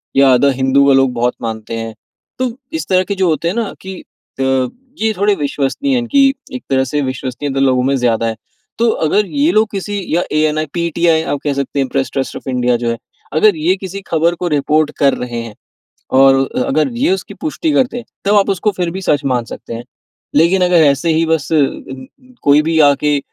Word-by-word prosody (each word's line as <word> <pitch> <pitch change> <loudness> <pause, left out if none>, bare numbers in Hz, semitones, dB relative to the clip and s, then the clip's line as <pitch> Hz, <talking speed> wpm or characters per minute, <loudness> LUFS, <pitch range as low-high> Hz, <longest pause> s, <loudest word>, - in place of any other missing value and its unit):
या 135 -1 +6
द 140 +2 +3
हिंदू 135 +2 +3
का 140 - +5
लोग 135 -1 +3
बहुत 120 +1 0
मानते 110 -1 -5
हैं। 115 0 -5 0.5
तो 255 -1 0 0.3
इस - - -6
तरह 185 0 +3
के 200 +2 -3
जो 190 -1 +1
होते 160 +1 0
हैं 175 - -1
ना 230 -3 -2
कि 190 0 -7 0.4
अ, - - +1 0.6
ये 220 0 +1
थोड़े 205 +1 +2
विश्वसनीय 145 - -1
है - - 0
कि 275 -1 +5 0.2
एक 255 - -6
तरह 130 -1 +2
से 145 +3 -1
विश्वसनीयता 135 +1 -3
लोगों 130 -2 +2
में 135 +2 +1
ज़्यादा 115 -3 +1
है। 110 - -2 0.4
तो 235 0 +3 0.2
अगर 210 +7 +2
ये 290 - +1
लोग 215 +1 +3
किसी 200 0 -4
या 175 - +2
एएनआइ, 155 0 +1
पीटीआइ 170 -1 +1
आप 145 -2 -2
कह 145 - 0
सकते 140 0 -3
हैं 135 - +1
प्रेस 135 -2 -1
ट्रस्ट 135 -1 -3
ऑफ - - -12
इंडिया 125 -1 +1
जो 120 - 0
है, 115 - -3 0.4
अगर 190 +5 +4
ये 170 +4 +2
किसी 190 +1 -7
खबर 165 +1 +1
को 175 - -3
रिपोर्ट 150 +1 +1
कर 140 -1 +4
रहे 120 -1 -4
हैं 115 -2 -9 0.7
और 135 0 +7 0.2
अ 255 - +1
अगर 270 - +1
ये 290 +7 +2
उसकी 385 - -4
पुष्टि 315 +1 -1
करते 255 -4 +1
हैं, 240 - -8 0.2
तब 200 +1 +2
आप 200 0 +3
उसको 195 +2 +1
फिर 175 -2 0
भी 190 +3 -5
सच 145 -5 +1
मान 125 -3 0
सकते 115 - -8
हैं। 115 +1 -7 0.5
लेकिन 170 +5 +4
अगर 175 -3 +4
ऐसे 140 +3 +2
ही 160 +1 +2
बस 160 -2 -1
अ, - - +4 0.9
कोई 145 +1 +5
भी 160 +1 0
आके, 145 +1 +1
155 Hz, 215 wpm, -16 LUFS, 135-190 Hz, 0.9 s, और